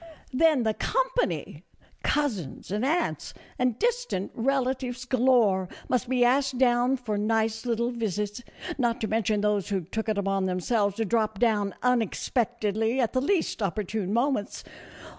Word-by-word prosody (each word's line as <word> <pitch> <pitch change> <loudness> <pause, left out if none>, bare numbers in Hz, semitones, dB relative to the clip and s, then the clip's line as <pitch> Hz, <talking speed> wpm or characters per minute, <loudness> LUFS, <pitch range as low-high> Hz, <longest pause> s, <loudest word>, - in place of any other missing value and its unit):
Then 300 -1 +4
the 220 -1 +1
company! - - -1 0.4
Cousins, 225 - -2
and 210 +3 -1
aunts, 320 +6 -1 0.2
and 250 -3 +1
distant 480 - -1
relatives 255 0 -1
galore, 235 -8 +3 0.2
must 250 -1 0
be 250 -1 +3
asked 260 +1 +2
down 250 +1 +3
for 220 -5 -3
nice 225 +2 0
little 235 +1 0
visits, 210 -1 -3 0.4
not 240 -1 +1
to 220 - 0
mention 215 -1 +1
those 210 -2 0
who 195 -2 0
took 220 +7 -4
it 215 - 0
upon 195 -1 0
themselves 200 +2 0
to 225 - -1
drop 220 -1 0
down 210 -3 +1
unexpectedly 235 -1 0
at 235 -4 +1
the 255 - +1
least 320 - 0
opportune 200 0 -2
moments. 240 -1 0
230 Hz, 140 wpm, -27 LUFS, 210-255 Hz, 0.4 s, Then